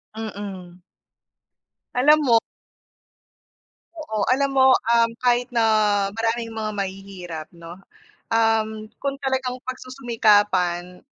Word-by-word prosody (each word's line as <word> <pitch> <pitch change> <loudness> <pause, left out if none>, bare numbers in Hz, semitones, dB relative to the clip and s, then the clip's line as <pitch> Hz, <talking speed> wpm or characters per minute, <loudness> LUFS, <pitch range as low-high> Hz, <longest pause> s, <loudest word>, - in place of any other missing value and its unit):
Mm. 195 -5 -7 1.2
Alam 290 +5 +5
mo 235 -3 +4 1.6
Oo, 220 -10 -3
alam 275 +1 +1
mo, 265 0 +6
um, 230 -1 +3
kahit 245 0 +2
na 230 -1 +2 0.5
maraming 230 +1 -1
mga 220 -1 -4
mahihirap, 190 -5 -6
no, 170 +1 -11 0.6
um, 220 -1 +1
kung 275 0 -4
talagang 260 -2 -2
pagsusumikapan, 210 -9 0
225 Hz, 90 wpm, -22 LUFS, 195-250 Hz, 1.6 s, mo